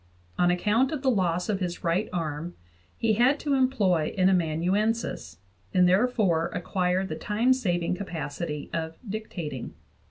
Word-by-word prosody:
On 175 0 +4
account 210 +8 +2
of 295 -3 -4
the 265 - +4
loss 180 -5 0
of 205 -3 0
his 180 -2 -4
right 175 +5 0
arm 165 -1 -3 0.4
he 225 -1 +2
had 250 +7 +3
to 290 - 0
employ 215 - +2
an 185 0 +4
amanuensis, 180 - 0 0.4
and 180 -1 +6
therefore 190 -4 +2
acquired 180 +1 0
the - - -4
time 230 +5 +2
saving 175 -9 0
capacity 160 -4 -5
of 160 0 -3
dictating. 180 - -5
185 Hz, 140 wpm, -27 LUFS, 170-220 Hz, 0.4 s, and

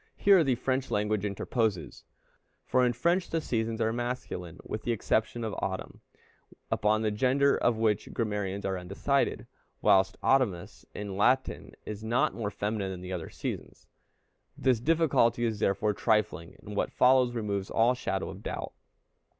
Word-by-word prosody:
Here 195 -4 +6
the 135 -4 +2
French 130 +2 -1
language 105 -1 0
interposes; 105 - -2 0.6
for 130 - +2
in 125 - +3
French 170 +9 +1
the 165 - 0
seasons 115 -5 -2
are 115 0 +1
masculine, 120 -8 -4
with 110 - -4
the 120 - -1
exception 115 +1 0
of 110 -2 -3
autumn, 95 -1 -4 0.7
upon 110 0 +2
the 110 - +1
gender 135 +6 +3
of 120 -2 +1
which 110 -2 0
grammarians 105 -3 -2
are 95 -1 -1
undecided, 100 +10 0 0.3
whilst 95 0 +3
Autumnus 120 -11 +1
in 100 -2 -5
Latin 130 +6 +1
is 105 0 -6
not 115 +3 +1
more 110 -3 -3
feminine 105 -1 -2
than 90 -1 -6
the 90 +1 -6
other 85 -3 -5
seasons. - - -6 0.7
This 130 -4 +2
difficulty 135 -5 +2
is 110 -2 -2
therefore 100 +2 +1
trifling, 105 -6 0
and 105 -1 -8
what - - 0
follows 125 -1 +4
removes 100 -4 -2
all 115 +2 +3
shadow 125 -6 -3
of - - -10
doubt. - - -5
110 Hz, 155 wpm, -29 LUFS, 100-125 Hz, 0.7 s, Here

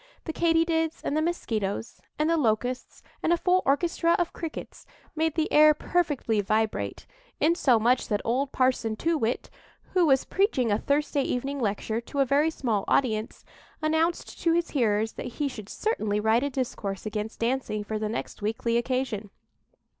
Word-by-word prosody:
The 320 - -4
Katy 330 0 +3
dids 325 -1 -1
and 285 - -1
the 310 - +2
Mosquitoes, 225 - -2 0.2
and 305 - +1
the 335 - +3
Locusts, 245 -2 -1 0.2
and 320 - +1
a 345 - +4
full 365 +2 +2
orchestra 335 +4 +2
of 345 - -1
Crickets 330 -3 -7 0.3
made 320 0 0
the 315 -1 0
air 305 0 +7
perfectly 290 -11 0
vibrate, 215 +2 -1 0.3
insomuch 255 -7 +3
that 205 -2 0
old 265 +4 0
Parson 255 -4 +1
Too 330 +9 0
Whit, 240 -4 -2 0.4
who 360 -3 +4
was 270 -2 +3
preaching 290 - +1
a 205 - +2
Thursday 285 0 +1
evening 275 +2 -2
lecture 220 0 -1
to 280 +4 -6
a 275 - +5
very 285 +4 +3
small 230 -10 -1
audience, 220 -4 0 0.3
announced 320 +2 0
to 335 - +3
his 340 0 0
hearers 220 -5 +1
that 245 - -6
he 295 - 0
should 215 -6 -8
certainly 215 - -1
write 220 +2 +3
a 285 - 0
discourse 230 -7 -4
against 215 +1 -4
dancing 230 -3 -1
for 215 +1 -3
the 215 0 -2
next 225 - -5
weekly 225 +2 0
occasion. 240 -4 -2
260 Hz, 170 wpm, -27 LUFS, 220-320 Hz, 0.4 s, air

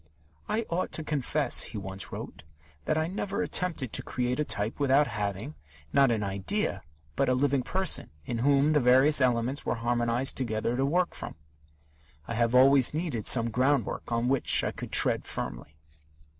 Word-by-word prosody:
"I 220 +2 -1
ought 175 +2 -3
to 160 - -2
confess," 145 -2 +1
he 110 - -6
once 95 -1 -6
wrote, - - -8 0.4
"that 155 - 0
I 160 - 0
never 195 +3 -3
attempted 160 -10 -1
to - - -1
create 125 +2 -3
a - - +2
type 105 -4 -1
without 140 +1 +3
having, 105 +4 -4 0.4
not 135 -1 +4
an 110 -3 -1
idea, 100 - -2 0.3
but - - +1
a 130 - +2
living 140 0 +1
person, 190 +9 +1 0.2
in 120 - -4
whom 140 +4 +2
the 150 - +3
various 135 +4 +4
elements 125 +1 0
were - - -2
harmonized 120 +2 -1
together, 115 -2 -2
to 135 +2 0
work 175 +4 0
from. - - -8 0.9
I - - -4
have 115 +1 0
always 135 +1 +5
needed 155 - -3
some 115 -2 +4
groundwork 130 -1 -1
on 115 +1 0
which 135 0 +3
I - - -1
could - - -9
tread - - +3
firmly." - - -6
130 Hz, 170 wpm, -27 LUFS, 115-145 Hz, 0.9 s, always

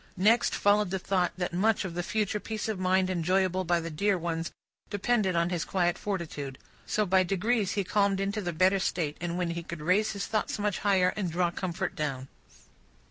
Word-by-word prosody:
Next 215 +6 +3
followed 205 -1 +3
the 190 - -1
thought 185 -1 0
that 180 -2 -2
much 210 +3 +2
of 180 - -5
the 175 - -2
future 210 +2 -1
peace 220 +1 -4
of 215 -4 -2
mind 185 0 +2
enjoyable 185 +1 +1
by 175 -1 +2
the 165 0 -5
dear 200 +5 +1
ones, 165 -1 -3 0.4
depended 205 -2 +1
on 170 +1 +1
his 175 -3 -1
quiet 175 -2 +1
fortitude. 155 -9 -4 0.3
So, 215 - +1
by 190 0 +4
degrees 195 +3 0
he 200 - 0
calmed 200 0 +1
into 200 +2 -1
the 175 -3 -2
better 185 +4 +3
state, 160 -5 -1
when 175 0 -1
he 170 0 -3
could 170 -1 -7
raise 185 +8 +2
his 200 -1 -3
thoughts 215 -1 -1
much 205 -2 -1
higher, 190 -3 +3
and 195 -4 -2
draw 175 +1 +1
comfort 175 -1 -3
down. 135 -3 -3
185 Hz, 195 wpm, -29 LUFS, 175-205 Hz, 0.4 s, by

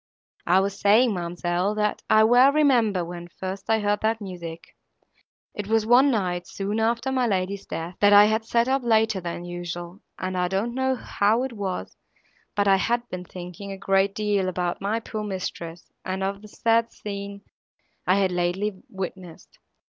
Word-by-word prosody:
"I 185 +2 +5
was 200 0 -3
saying, 215 +4 +4
ma'amselle, 175 +2 -1
that 210 0 0
I 215 0 +6
well 245 +4 +6
remember 240 - +3
when 175 0 -8
first 190 +2 -7
I 225 - +4
heard 205 -1 0
that 220 +1 +1
music. 175 -5 -8 0.8
It 205 -1 -5
was 220 0 +2
one 250 +5 +6
night, 180 -7 -1
soon 205 +2 -3
after 235 +3 0
my 255 -2 +1
lady's 195 -1 -2
death, 170 +2 -5
that 205 0 +5
I 205 0 +9
had 220 +1 +1
sat 235 +1 +1
up 265 +1 +1
later 220 -4 +2
than 170 0 -5
usual, 175 +1 -6 0.2
and 185 0 -3
I 180 -1 +1
don't 195 +6 -1
know 260 +1 0
how 225 0 +1
it 265 -2 -4
was, 195 -4 -4 0.6
but 205 0 +2
I 195 -1 +6
had 240 +4 0
been 180 0 -6
thinking 180 +2 -8
a 195 - -6
great 195 0 +1
deal 205 -3 0
about 180 -1 -2
my 210 +3 0
poor 215 -2 -5
mistress, 180 -4 -6
and 190 +1 -3
of 195 +1 -2
the 215 - -12
sad 230 +2 +1
scene 200 -1 -7 0.6
I 185 - +5
had 195 -2 +2
lately 185 +3 -1
witnessed. 185 -3 -8
200 Hz, 175 wpm, -25 LUFS, 185-220 Hz, 0.8 s, I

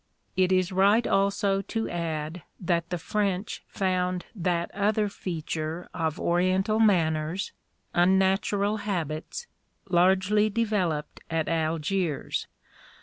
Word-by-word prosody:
It 185 0 +3
is 185 -1 +2
right 200 +5 +4
also 195 0 +2
to 225 +2 -3
add 165 -1 -3 0.2
that 170 -2 0
the 180 - -1
French 195 +2 -2
found 180 -2 -1
that 175 -4 -1
other 210 +1 +1
feature 165 -2 -4
of 160 -2 -2
Oriental 185 +5 +2
manners, 165 -4 +2 0.4
unnatural 190 +3 +3
habits, 175 - -3 0.4
largely 190 +4 +3
developed 200 -9 -1
at 160 -1 0
Algiers. 165 0 -1
185 Hz, 100 wpm, -27 LUFS, 170-200 Hz, 0.4 s, right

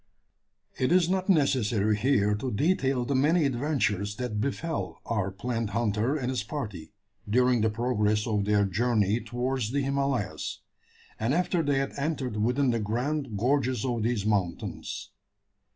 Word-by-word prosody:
It 130 +4 +1
is 180 -1 +5
not 190 +1 -1
necessary 120 - +3
here 105 -2 +2
to 110 +6 -2
detail 135 - +1
the 140 - -1
many 150 +5 +3
adventures 120 -7 0
that 110 -3 -3
befel 140 - -3
our 100 -4 -1
plant 115 +3 -3
hunter 115 +4 +1
and 130 -3 -2
his 125 -4 -1
party, 105 - -6 0.4
during 125 +1 +3
the 110 - +3
progress 105 -2 0
of 105 -3 0
their 105 -1 +3
journey 105 +1 +1
towards 125 -2 -2
the 140 +1 0
Himalayas, 135 -5 -2 0.6
and 115 +6 +1
after 180 0 +1
they 145 -3 +1
had 135 0 -1
entered 140 -6 -2
within 125 +5 +2
the 115 - 0
grand 120 +3 -2
gorges 130 0 +1
of 120 -3 -1
these 110 -2 0
mountains. 100 -5 -2
120 Hz, 150 wpm, -28 LUFS, 105-140 Hz, 0.6 s, is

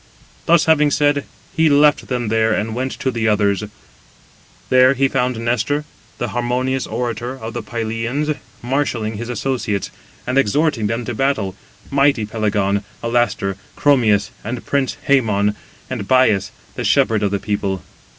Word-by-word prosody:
Thus 170 -1 +5
having 150 -2 +4
said, 145 0 +2 0.3
he 160 -1 +4
left 145 0 +4
them 120 -4 -2
there 110 0 +2
and 110 +1 -1
went 130 +3 -2
to 130 - -2
the 115 -2 -1
others; 105 -1 +2 1.1
there 130 +1 +5
he 135 +1 +3
found 125 -2 0
Nestor, 120 +6 0 0.3
the 120 - -2
harmonious 125 +1 -1
orator 120 +1 -3
of 115 -2 -7
the 120 - -3
Pylians, 115 +7 -2 0.3
marshalling 120 -5 -1
his 120 +2 -5
associates, 120 -5 -2 0.3
and 130 +2 +2
exhorting 135 -1 +1
them 115 +2 -2
to 120 - -3
battle, 110 -7 0 0.4
mighty 140 -5 +3
Pelagon, 105 -2 0 0.2
Alastor, 115 -5 0 0.2
Chromius, 110 -8 +3
and 120 +3 -5
prince 140 -2 0
Hæmon, 105 -7 +3 0.3
and 115 -6 -5
Bias 110 -7 +3 0.2
the - - -4
shepherd 110 -2 +3
of 100 - +1
the 100 - 0
people. 100 -3 -2
120 Hz, 145 wpm, -19 LUFS, 110-135 Hz, 1.1 s, Thus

